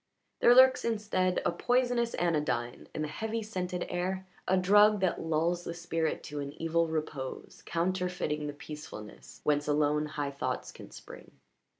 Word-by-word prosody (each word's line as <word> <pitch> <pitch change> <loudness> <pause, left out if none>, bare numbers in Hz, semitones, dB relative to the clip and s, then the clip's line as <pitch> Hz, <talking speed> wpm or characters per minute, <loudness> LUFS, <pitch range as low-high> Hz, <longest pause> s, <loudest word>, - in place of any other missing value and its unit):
There 240 - +6
lurks 260 0 +7
instead 205 -5 0
a - - +3
poisonous 245 +4 +1
anodyne 150 -8 -1
in 155 - -1
the - - -2
heavy, 220 +8 -3
scented 180 -4 -3
air 185 +2 -2 0.2
a 190 - +3
drug 205 +3 +5
that 185 - +1
lulls 165 +2 0
the 170 - -5
spirit 165 -2 -2
to 150 0 -6
an 140 0 -5
evil 165 0 +1
repose 155 -4 -5
counterfeiting 175 -3 -1
the 145 - -4
peacefulness 145 -8 -10
whence 145 0 +1
alone 150 0 +2
high 145 -2 -3
thoughts 130 -2 -3
can - - -12
spring. - - -12
170 Hz, 155 wpm, -30 LUFS, 150-190 Hz, 0.2 s, lurks